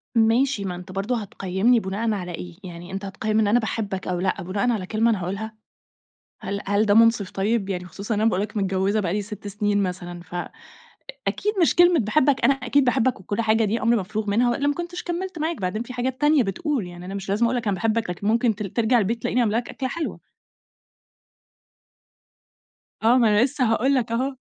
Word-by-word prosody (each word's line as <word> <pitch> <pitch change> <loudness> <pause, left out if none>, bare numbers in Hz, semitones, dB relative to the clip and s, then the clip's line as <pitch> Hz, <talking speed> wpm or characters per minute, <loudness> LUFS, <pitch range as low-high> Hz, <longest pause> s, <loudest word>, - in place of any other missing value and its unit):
ماشي، 230 0 +3
ما 180 -2 -3
أنت 180 +1 -10
برضه 200 +6 -1
هتقيمني 195 +4 +1
بناءً 215 +3 -2
على 180 -3 -4
إيه، 175 0 -7
يعني، 175 0 -9
أنت 195 +1 -5
هتقيم 215 +3 -1
أنا 230 +4 +4
باحبك 205 -4 -3
أو 180 -1 -1
لأ 185 +1 -1
بناءً 200 +7 0
على 200 -5 -2
كلمة 225 +3 +2
أنا 205 -5 0
هاقولها، 200 +5 -4 0.9
هل 200 0 -4
هل 205 +2 +2
ده 205 - +4
منصف 225 -3 +4
طيب، 200 +1 0
يعني 180 -2 -3
خصوصًا 200 +5 -4
إن 210 - -1
أنا 225 +1 +4
باقول 190 +2 0
لك 210 +1 -6
متجوزة 195 +1 +1
بقى 180 -4 -1
لي 205 +1 -1
6 205 0 -8
سنين 205 0 0
مثلًا، 175 -2 -4
فأكيد 175 +1 -8 0.9
مش 330 - +3
كلمة 350 -2 +6
باحبك، 260 +5 +2
أنا 275 - +6
أكيد 270 +1 +1
باحبك 250 -2 +1
وكل 205 +4 -2
حاجة، 220 0 +2
دي 220 +3 -1
أمر 230 +1 +3
مفروغ 210 +2 -3
منها، 240 +4 +3
وإلا 280 +4 0
ما 290 - +2
كنتش 345 +3 -5
كملت 350 -1 -4
معاك، 320 - -2
بعدين 210 +5 -2
في 250 - -9
حاجات 255 +2 -3
تانية 295 -2 +4
بتقول 225 - -2
يعني، 175 0 -10
أنا 195 - -6
مش 195 -1 -6
لازم 210 +4 +2
أقول 235 +2 +1
لك 235 - -3
أنا 200 - +1
باحبك، 225 +2 0
لكن 180 +3 -4
ممكن 230 -1 +2
ت 210 - -5
ترجع 230 +5 +2
البيت 225 +3 -1
تلاقيني 250 - +1
عاملة 220 -1 +1
لك 240 - -3
أكلة 260 -1 -4
حلوة. 335 -2 -4 2.8
آه 235 +3 +5
ما 235 -3 +4
أنا 210 +2 +4
لسه 255 0 0
هاقول 260 +5 +2
لك 235 -3 0
أهو، 260 +4 -1
215 Hz, 210 wpm, -23 LUFS, 195-245 Hz, 2.8 s, كلمة